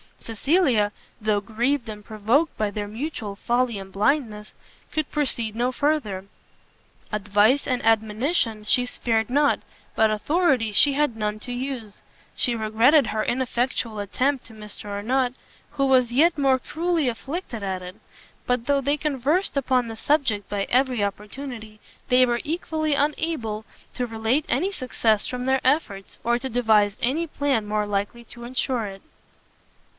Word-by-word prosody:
Cecilia, 230 - +1 0.3
though 210 -1 +1
grieved 240 +5 -1
and 210 -1 -7
provoked 225 +10 +1
by 210 -1 0
their 205 0 -4
mutual 220 -2 -5
folly 240 +1 0
and 195 -1 -9
blindness, 210 -1 0 0.4
could 310 -2 -2
proceed 235 -7 0
no 245 +2 +1
further: 255 -10 -1 0.9
advice 210 +5 +2
and 250 -2 -1
admonition 225 +2 +1
she 245 +4 +3
spared 225 -2 -1
not, 285 +3 +3 0.4
but 220 0 +4
authority 250 +1 +1
she 280 +7 +5
had 290 -4 +1
none 210 -1 -2
to 245 - -6
use. 245 -4 -5 0.3
She 245 -3 +2
regretted 230 +5 +4
her 215 0 -1
ineffectual 245 -3 -1
attempt 255 +7 -1
to 225 - -13
Mr 210 -1 -10
Arnott, 245 +5 0 0.4
who 275 - 0
was 255 -3 +4
yet 325 +5 +4
more 270 -2 +3
cruelly 325 +2 -1
afflicted 245 - -4
at 190 -2 -3
it; 180 +1 -8 0.5
but 250 -1 0
though 280 +1 +2
they 285 +2 +1
conversed 295 +4 0
upon 255 -3 +1
the 225 - -6
subject 260 -8 +1
by 200 -1 -1
every 250 -3 +2
opportunity, 215 +2 -6 0.3
they 255 0 +6
were 240 -1 0
equally 310 -1 -1
unable 280 -7 -1 0.3
to 250 -1 -2
relate 225 +6 0
any 385 +3 +1
success 230 - 0
from 250 0 -4
their 265 0 +2
efforts, 255 -9 0
or 240 +1 +2
to 265 +1 -4
devise 220 -4 +3
any 300 +8 +1
plan 275 -8 0
more 210 0 0
likely 205 +4 -3
to 235 +1 -11
ensure 250 -1 -1
it. 195 -1 -8
240 Hz, 150 wpm, -24 LUFS, 215-275 Hz, 0.9 s, they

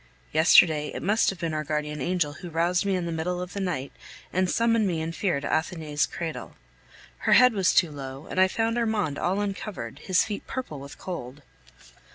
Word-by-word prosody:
Yesterday, 155 -1 +5
it - - -5
must 210 +3 +3
have 195 - -4
been 165 -2 -3
our 155 0 -1
guardian 150 0 -3
angel 170 -1 0
who 175 - -7
roused 170 +3 +1
me 195 - +2
in 180 -2 -2
the 170 - -3
middle 170 +2 -2
of 180 0 -6
the 200 - -4
night 170 -8 -2 0.4
and 185 0 +1
summoned 230 -1 +2
me 170 -3 -1
in 160 +1 -3
fear 165 -1 0
to 140 - -5
Athenais' 155 -2 0
cradle. 165 -2 -6 0.6
Her - - +2
head 250 -1 +7
was 195 -3 +3
too 170 -4 +3
low, 135 0 -8
and 185 - 0
I 190 - +6
found 225 +4 0
Armand 210 -11 0
all 190 +3 0
uncovered, 205 0 -4
his 185 -2 +2
feet 210 -2 -6
purple 250 - -5
with 140 +1 -10
cold. 145 -6 -7
175 Hz, 205 wpm, -26 LUFS, 155-195 Hz, 0.6 s, head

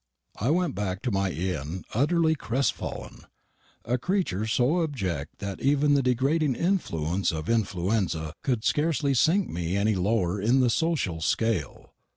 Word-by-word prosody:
I 115 - 0
went 170 -2 +1
back 95 -1 -3
to 125 - -1
my 95 -1 +1
inn 90 -1 -3
utterly 160 +6 +3
crestfallen 135 -2 -3 0.6
a 125 +2 0
creature 145 - -1
so 130 +10 +2
abject 95 - -3
that 100 -1 -6
even 145 +1 +3
the 140 - +4
degrading 135 +3 +1
influence 95 - 0
of 80 -1 -5
influenza 95 -6 0
could 125 -5 -1
scarcely 150 -2 +1
sink 175 +9 +3
me 85 +2 -2
any 105 +2 +2
lower 95 -1 0
in 120 +6 +3
the 125 -2 +3
social 135 - 0
scale. 95 - -1
115 Hz, 145 wpm, -26 LUFS, 95-145 Hz, 0.6 s, the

